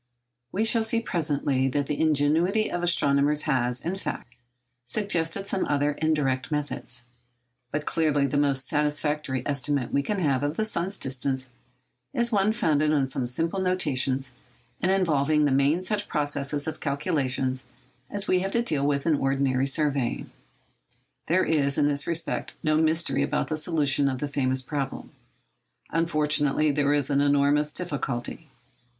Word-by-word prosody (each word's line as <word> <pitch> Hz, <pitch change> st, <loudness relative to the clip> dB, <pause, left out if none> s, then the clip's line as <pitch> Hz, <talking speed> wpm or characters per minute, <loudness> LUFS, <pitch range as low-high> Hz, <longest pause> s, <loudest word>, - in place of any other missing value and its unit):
We 215 Hz, +4 st, 0 dB
shall 225 Hz, 0 st, +4 dB
see 225 Hz, +1 st, +1 dB
presently 145 Hz, -, 0 dB
that 140 Hz, +2 st, 0 dB
the 145 Hz, 0 st, -2 dB
ingenuity 160 Hz, +7 st, +2 dB
of 175 Hz, -, -2 dB
astronomers 150 Hz, -3 st, +3 dB
has, 125 Hz, -4 st, 0 dB
in 175 Hz, +3 st, -1 dB
fact, 125 Hz, -9 st, -6 dB, 0.5 s
suggested 195 Hz, -, 0 dB
some 195 Hz, -, -1 dB
other 145 Hz, 0 st, +1 dB
indirect 145 Hz, -4 st, 0 dB
methods. 145 Hz, -4 st, -2 dB, 0.7 s
But 150 Hz, 0 st, -2 dB
clearly 150 Hz, -3 st, +1 dB
the 140 Hz, -, -2 dB
most 135 Hz, -3 st, +1 dB
satisfactory 150 Hz, -3 st, -1 dB
estimate 140 Hz, -2 st, -1 dB
we 140 Hz, -, +3 dB
can 205 Hz, +8 st, -2 dB
have 140 Hz, -7 st, +1 dB
of 145 Hz, +2 st, -2 dB
the 220 Hz, -, +1 dB
sun's 195 Hz, -2 st, -3 dB
distance 130 Hz, 0 st, -3 dB, 0.7 s
is 235 Hz, 0 st, +1 dB
one 205 Hz, -1 st, +3 dB
founded 155 Hz, -9 st, +1 dB
on 145 Hz, -3 st, +2 dB
such 130 Hz, -2 st, -3 dB
simple 165 Hz, +8 st, -1 dB
notions 135 Hz, -8 st, 0 dB, 0.5 s
and 185 Hz, -, +1 dB
involving 155 Hz, -6 st, +2 dB
in -, -, +4 dB
the 145 Hz, -, +2 dB
main 140 Hz, +6 st, +2 dB
such 205 Hz, +2 st, -1 dB
processes 145 Hz, 0 st, -1 dB
of 160 Hz, -1 st, -5 dB
calculation 140 Hz, -3 st, -1 dB, 0.5 s
as 205 Hz, 0 st, -3 dB
we 185 Hz, -, +3 dB
have 195 Hz, +1 st, -2 dB
to 235 Hz, -, +2 dB
deal 145 Hz, -9 st, +1 dB
with 140 Hz, -1 st, 0 dB
in 160 Hz, -3 st, +3 dB
ordinary 135 Hz, -1 st, +1 dB
surveying. 140 Hz, -4 st, -1 dB, 1.0 s
There 185 Hz, +3 st, +3 dB
is, 140 Hz, -3 st, +1 dB
in -, -, +3 dB
this 145 Hz, -1 st, 0 dB
respect, 165 Hz, 0 st, -2 dB
no 155 Hz, -1 st, +2 dB
mystery 160 Hz, -1 st, +1 dB
about 145 Hz, +1 st, -1 dB
the 155 Hz, -, 0 dB
solution 150 Hz, -3 st, +2 dB
of 130 Hz, -, -2 dB
the 145 Hz, -, -3 dB
famous 130 Hz, -2 st, -1 dB
problem. 140 Hz, 0 st, -4 dB, 0.8 s
Unfortunately, 150 Hz, -2 st, +1 dB
there 145 Hz, 0 st, +1 dB
is 145 Hz, -1 st, +1 dB
enormous 145 Hz, +1 st, +3 dB
difficulty. 145 Hz, -3 st, -4 dB
145 Hz, 155 wpm, -26 LUFS, 140-165 Hz, 1.0 s, shall